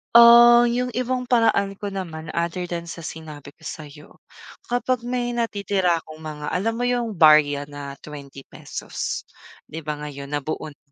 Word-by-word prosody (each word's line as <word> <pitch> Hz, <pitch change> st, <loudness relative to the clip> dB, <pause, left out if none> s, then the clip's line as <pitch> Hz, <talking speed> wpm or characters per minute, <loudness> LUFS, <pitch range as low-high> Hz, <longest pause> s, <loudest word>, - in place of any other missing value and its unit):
ah, 235 Hz, 0 st, +9 dB
yung 250 Hz, +1 st, -1 dB
ibang 250 Hz, +1 st, -1 dB
paraan 225 Hz, -5 st, +2 dB
ko 200 Hz, +1 st, -6 dB
naman 165 Hz, -5 st, -6 dB
other 170 Hz, +1 st, -2 dB
than 170 Hz, -1 st, -4 dB
sa 170 Hz, 0 st, -8 dB
sinabi 155 Hz, -3 st, -9 dB
ko 160 Hz, +3 st, -19 dB
sayo, 150 Hz, -1 st, -9 dB, 0.6 s
kapag 245 Hz, 0 st, 0 dB
may 245 Hz, 0 st, -2 dB
natitira 200 Hz, -6 st, 0 dB
akong 155 Hz, -1 st, -11 dB
mga 150 Hz, -1 st, -6 dB
alam 215 Hz, +5 st, 0 dB
mo 245 Hz, -, -1 dB
yung, 240 Hz, -4 st, -1 dB
barya 150 Hz, -2 st, +5 dB
na 145 Hz, -1 st, -8 dB
₱20 140 Hz, -2 st, -7 dB, 0.4 s
di 160 Hz, -, -8 dB
ba 150 Hz, -1 st, -4 dB
ngayon 140 Hz, -2 st, -7 dB
nabuo 150 Hz, +2 st, -3 dB
na 145 Hz, -, -17 dB
170 Hz, 155 wpm, -23 LUFS, 150-235 Hz, 0.6 s, ah